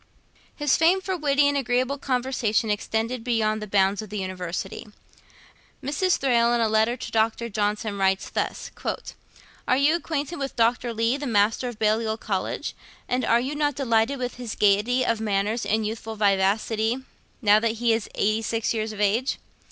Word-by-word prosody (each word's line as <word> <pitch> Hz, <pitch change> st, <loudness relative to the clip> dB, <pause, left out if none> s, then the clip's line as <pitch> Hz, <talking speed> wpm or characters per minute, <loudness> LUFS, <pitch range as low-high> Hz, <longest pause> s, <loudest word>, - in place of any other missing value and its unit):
His 295 Hz, -2 st, +2 dB
fame 340 Hz, +4 st, +4 dB
for 380 Hz, 0 st, -3 dB
witty 290 Hz, -3 st, +2 dB
and 285 Hz, -, +1 dB
agreeable 255 Hz, +1 st, 0 dB
conversation 245 Hz, -5 st, 0 dB
extended 225 Hz, +3 st, -2 dB
beyond 220 Hz, -3 st, 0 dB
the 210 Hz, -, -5 dB
bounds 195 Hz, 0 st, +2 dB
of 215 Hz, -, -9 dB
the 210 Hz, -, -5 dB
University. 185 Hz, 0 st, -5 dB, 1.0 s
Mrs. 300 Hz, +7 st, +1 dB
Thrale, 240 Hz, -3 st, +3 dB
in -, -, +1 dB
a 230 Hz, -, +3 dB
letter 220 Hz, +3 st, +2 dB
to -, -, -7 dB
Dr. 225 Hz, +1 st, 0 dB
Johnson, 210 Hz, 0 st, -1 dB
writes 190 Hz, 0 st, +1 dB
thus: -, -, -3 dB, 1.0 s
'Are 255 Hz, -, +3 dB
you 285 Hz, +3 st, +4 dB
acquainted 320 Hz, -1 st, -3 dB
with 275 Hz, -1 st, -4 dB
Dr. 235 Hz, +1 st, +1 dB
Leigh, 230 Hz, +3 st, +1 dB
the 285 Hz, 0 st, -4 dB
Master 220 Hz, +2 st, +2 dB
of 240 Hz, -3 st, -6 dB
Balliol 220 Hz, 0 st, +1 dB
College, 195 Hz, -4 st, -3 dB, 0.3 s
and 250 Hz, +1 st, 0 dB
are 230 Hz, +1 st, +3 dB
you 260 Hz, +4 st, -3 dB
not 295 Hz, -2 st, 0 dB
delighted 245 Hz, 0 st, +1 dB
with 250 Hz, -1 st, -4 dB
his 245 Hz, -3 st, -5 dB
gaiety 210 Hz, +5 st, +3 dB
of 230 Hz, -2 st, 0 dB
manners 210 Hz, +2 st, 0 dB
and 220 Hz, +1 st, +1 dB
youthful 220 Hz, +1 st, -5 dB
vivacity, 215 Hz, +3 st, +1 dB, 0.5 s
now 210 Hz, 0 st, +6 dB
that 225 Hz, 0 st, 0 dB
he 230 Hz, 0 st, +1 dB
is 225 Hz, -2 st, -2 dB
eighty 215 Hz, +2 st, +1 dB
six 225 Hz, 0 st, -1 dB
years 220 Hz, -1 st, -2 dB
of 215 Hz, -, -9 dB
age? 215 Hz, +6 st, +1 dB
225 Hz, 175 wpm, -25 LUFS, 215-255 Hz, 1.0 s, now